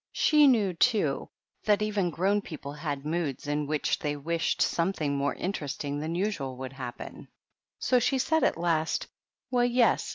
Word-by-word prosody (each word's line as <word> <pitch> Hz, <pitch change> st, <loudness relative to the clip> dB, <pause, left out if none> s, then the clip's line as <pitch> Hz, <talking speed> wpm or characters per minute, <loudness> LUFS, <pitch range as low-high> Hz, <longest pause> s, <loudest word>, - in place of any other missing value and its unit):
She 300 Hz, -2 st, +5 dB
knew, 215 Hz, -8 st, +3 dB
too, 175 Hz, -, +1 dB, 0.3 s
that 210 Hz, -1 st, +3 dB
even 205 Hz, -4 st, 0 dB
grown 195 Hz, +5 st, +1 dB
people 145 Hz, -6 st, -8 dB
some 150 Hz, -, -12 dB
times 145 Hz, -3 st, -3 dB
have -, -, -16 dB
moods 155 Hz, -4 st, -2 dB
in 145 Hz, 0 st, -1 dB
which 150 Hz, 0 st, 0 dB
they 145 Hz, -1 st, -2 dB
wish 160 Hz, +3 st, -1 dB
something 165 Hz, -5 st, 0 dB
more 140 Hz, 0 st, 0 dB
interesting 145 Hz, -5 st, -3 dB
than 160 Hz, +3 st, -3 dB
usual 165 Hz, -10 st, -2 dB
would 130 Hz, 0 st, -6 dB
happen; 130 Hz, -3 st, -8 dB, 0.5 s
so 250 Hz, -, +2 dB
she 265 Hz, +3 st, +1 dB
said, 320 Hz, +5 st, +1 dB
at -, -, +2 dB
last, 165 Hz, -2 st, 0 dB, 0.2 s
— -, -, -63 dB
"Well, 245 Hz, -1 st, +3 dB
yes. 245 Hz, -1 st, +2 dB
165 Hz, 175 wpm, -28 LUFS, 145-210 Hz, 0.5 s, She